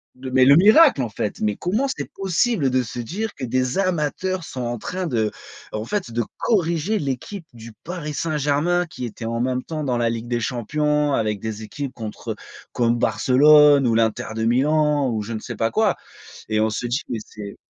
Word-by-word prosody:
de 130 0 -7
mais 130 0 +5
le 140 +1 +7
miracle, 215 - +6
en 115 - -3
fait! 105 0 -4
Mais 105 -1 +1
comment 215 +10 -1
c'est 265 - -5
possible 195 - +1
de 130 0 +2
se 120 - -8
dire 205 - -4
que 130 - -5
des 130 +4 0
amateurs 185 +1 -1
sont 130 -5 -6
en 120 0 -2
train 185 - -4
de 110 -5 0 0.4
en 110 +1 -4
fait, 205 - -2
de 120 0 0 0.2
corriger 180 -1 +1
l'équipe 150 +6 -4
du 115 0 -11
Paris 165 -4 -5
Saint-Germain, 155 +3 +1
qui 125 - -6
était, 115 0 -7
en 115 +1 -2
même 130 0 0
temps, 155 -2 -4
dans 125 -3 0
la 115 -1 +2
Ligue 115 +1 -4
des 120 -1 -1
champions 150 +5 0
avec 105 -4 0
des 110 0 -5
équipes 135 +4 -6
contre 110 -3 -6
eux, - - -4 0.4
comme 120 0 +2
Barcelone 145 +2 +5
ou 115 - +2
l'Inter 110 -1 +1
de 110 - -2
Milan 145 +2 +2
ou, 110 -1 -1
je 115 +2 -6
ne 110 - -3
sais 120 0 -7
pas 115 +1 0
quoi. 220 -1 +2 0.5
Et 110 0 +1
on 110 0 +2
se 110 +3 -3
dit: 125 +5 -1
«Mais 115 - -2
c'est» 100 -2 -9
130 Hz, 205 wpm, -22 LUFS, 115-160 Hz, 0.5 s, le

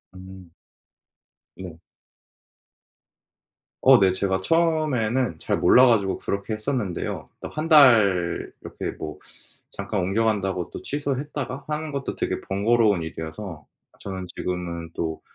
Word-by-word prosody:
음. 95 -1 -12 1.1
네. 90 -4 -9 2.0
어 - - +7
네. 95 -1 +4
제가 95 +1 0
처음에는 130 - +1
잘 - - -1
몰라 130 - +6
가지고 105 -6 +2
그렇게 100 +2 -3
했었는데요. 110 -4 -3
어 - - -5
1 155 +1 -4
달 110 - +5
이렇게 - - -5
뭐 75 -1 -7 0.5
잠깐 100 +1 -4
옮겨간다고 95 -2 0
또 - - -7
취소했다가 140 -1 -4
하는 155 0 -3
것도 140 -1 -4
되게 - - -2
번거로운 105 -2 +2
일이어서 80 0 -7 0.3
저는 95 -2 -6
지금은 85 -2 -4
또 80 -1 -4
100 Hz, 245 characters per minute, -24 LUFS, 90-130 Hz, 2.0 s, 어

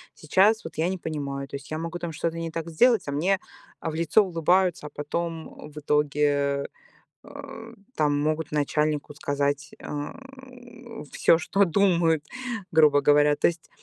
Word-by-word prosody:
Сейчас 200 +8 +3
вот - - -8
я 165 +3 +1
не 190 - -2
понимаю. 140 -4 -4
То 140 - -8
есть 140 - -9
я 155 - -2
могу 165 +2 -4
там 170 -1 -4
что-то 165 +2 -2
не 165 -1 -4
так 165 +1 -5
сделать, 225 - +3
а, - - -2
мне 185 +6 +1 0.4
в 160 - -3
лицо 165 +6 +3
улыбаются, 175 -2 +1
а, - - -9
потом 160 0 -5
в 150 - -8
итоге, 145 -1 +1 0.6
а, - - -10 0.2
там 145 -2 +1
могут 155 0 -1
начальнику 150 0 0
сказать, 145 0 -2
а, 145 0 -5 1.0
всё, 165 - +4
что 195 +4 +1
думают, 170 -4 +2 0.5
грубо 150 -3 +5
говоря. 145 0 +4
То - - +3
есть 170 -1 -5
155 Hz, 155 wpm, -25 LUFS, 145-170 Hz, 1.0 s, грубо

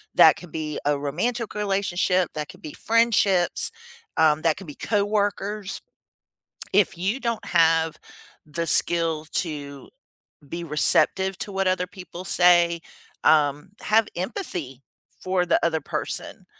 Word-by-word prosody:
that - - +8
can 175 - -11
be 155 -1 -4
a 145 0 +2
romantic 225 - -2
relationship, 195 -3 0
that 150 -1 -3
can - - -13
be 150 - -8
friendships, 215 -6 +2 0.5
um, 155 -1 +4
that 165 -2 +3
can 190 - -10
be 145 - -9
coworkers. 205 -1 -1 0.9
If 195 -3 +3
you 195 +9 -1
don't 235 -3 -2
have 165 -2 +3 0.5
the 165 +3 -3
skill 165 -2 +1
to 145 -4 -4 0.6
be 170 +3 -5
receptive 190 +5 +2
to 200 - -6
what 195 -1 0
other 185 -1 0
people 180 -1 -10
say, 175 -2 +4 0.4
um, 150 +1 +3
have 220 0 +2
empathy 175 - -5 0.4
for 185 -1 +1
the 175 - +3
other 160 -2 +1
person - - -5
175 Hz, 130 wpm, -24 LUFS, 160-200 Hz, 0.9 s, that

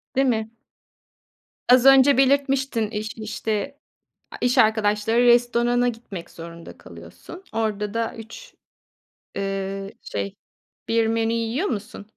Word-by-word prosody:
Değil 270 0 +3
mi? 220 -2 -1 1.2
Az 250 +1 +6
önce 270 0 +7
belirtmiştin 270 -4 +1
iş 215 0 -5
işte, 220 +5 -4 0.5
a - - -8
iş 245 +1 +1
arkadaşları 220 0 +2
restorana 240 0 +3
gitmek 220 -7 -6
zorunda 170 0 -11
kalıyorsun. 85 - -13
Orada 210 -2 -2
da 230 0 -2
3, 480 - -12 0.8
eee, 195 0 -4
şey, 100 -1 -5 0.5
1 225 -1 +2
menü 225 0 0
yiyor 230 - -1
musun? 205 -1 -5
225 Hz, 115 wpm, -23 LUFS, 210-245 Hz, 1.2 s, önce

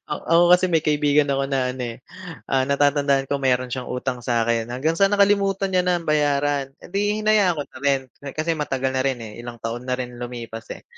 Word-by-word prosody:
Ah, 150 - -3
ako 165 +1 +4
kasi 180 +1 +5
may 165 -2 +2
kaibigan 150 -1 +2
ako 135 0 0
na 130 -2 0
ano, 130 -1 -6
eh, - - -20 0.5
ah, 135 -1 +2
natatandaan 140 -1 +2
ko 140 -1 -1
mayro'n 130 -1 +1
siyang 130 -1 -4
utang 125 0 -3
sa'kin 115 -2 0
hanggang 130 +6 -1
sa 195 +2 +4
nakalimutan 200 -1 +2
niya 180 - +3
nang 175 -2 0
bayaran, 145 -2 +1
eh, - - -13
'di 205 +2 0
hinayaan 205 -5 +3
ko 145 - -2
na - - -13
rin 140 -1 +3 0.4
kasi 160 +2 0
matagal 135 -3 -2
na 130 - 0
rin, 135 -2 +1
eh, 110 0 -9
ilang 120 0 -8
taon 115 +2 -5
na 125 - +1
rin 125 -1 -6
lumipas, 120 -2 -7
eh. - - -12
140 Hz, 215 wpm, -22 LUFS, 125-165 Hz, 0.5 s, kasi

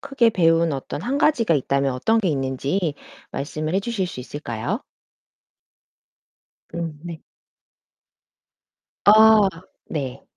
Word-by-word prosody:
크게 275 -4 +2
배운 165 -4 +2
어떤 135 +1 -5
1 260 +5 -1
가지가 240 - +3
있다면 140 -1 0
어떤 225 - +1
게 200 -5 0
있는지 140 +4 -1 0.4
말씀을 155 +3 -4
해 195 - +2
주실 200 -3 -2
수 - - -9
있을까요? 125 -4 -4 1.9
음 165 -3 -4
네. 170 -2 -8 1.8
아 215 -1 +7 0.4
네. 135 -5 -5
165 Hz, 190 characters per minute, -22 LUFS, 140-215 Hz, 1.9 s, 아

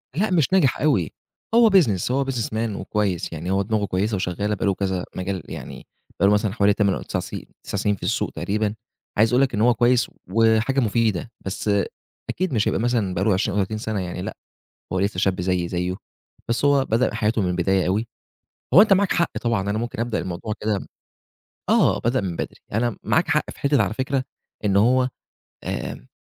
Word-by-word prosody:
لأ، 210 +7 +1
مش 165 -2 +2
ناجح 145 -10 +3
أوي، 100 - +2 0.4
هو 235 -1 +7
business، 125 - +3
هو 135 +1 +1
businessman 115 -4 -2
وكويس، 100 -7 -2
يعني 85 +3 -4
هو 95 +1 +2
دماغه 105 +1 0
كويسة 100 +3 -1
وشغّالة 100 +3 -1
بقى - - -3
له 100 - +3
كذا 95 -2 -2
مجال 95 0 -3
يعني - - -8 0.3
بقى 100 - +5
له 100 - +5
مثلًا 105 -1 +1
حوالي 105 -2 +3
8 100 -2 +2
أو - - -4
تِسَع - - -3
سي - - -7 0.2
9 - - -4
سِنين 105 +1 +1
في - - -15
السوق - - 0
تقريبًا. 105 +1 -1 0.4
عايز 110 +3 +4
أقول 125 - +5
لك 135 -2 +1
إن 105 - 0
هو 120 +1 +5
كويس 120 +1 +3 0.2
وحاجة 115 +4 +3
مفيدة، 115 -2 0
بس 95 +2 -3 0.6
أكيد 185 -4 -1
مش 110 -3 +1
هيبقى - - +1
مثلًا 115 -5 0
بقى 90 - -1
له 105 -1 +3
20 100 +1 0
أو 100 - +3
30 110 +3 -4
سَنة 110 -2 -3
يعني 90 0 -4
لأ، - - -6 0.6
هو 95 - +1
لسّه 100 -1 -1
شاب 95 -1 +1
زيّي 90 -1 0
زيّه، 90 +1 -2 0.5
بس 120 +4 0
هو 140 -1 +4
بدأ 115 +3 +1
حياته 110 +1 +1
من 90 - 0
البداية 90 +1 +1
أوي. 105 +5 0 0.7
هو 190 - +10
أنت 210 -2 +6
معاك 195 0 +2
حق 170 - 0
طبعًا، 115 -4 +1
أنا 105 - 0
ممكن 120 0 -4
أبدأ 115 -4 -1
الموضوع 90 +5 -4
كده 105 -2 0
م - - -9 0.8
آه، - - +4
بدأ 120 +3 +1
من 90 -4 -3
بدري. - - -4 0.2
أنا 115 0 0
معاك - - +2
حق - - +1
في - - -14
حتّة 140 -5 +3
على 105 - -2
فكرة 130 +1 -1 0.4
إن 100 -1 +3
هو 125 +4 +4 0.6
آآ - - -5
105 Hz, 205 wpm, -23 LUFS, 95-120 Hz, 0.8 s, هو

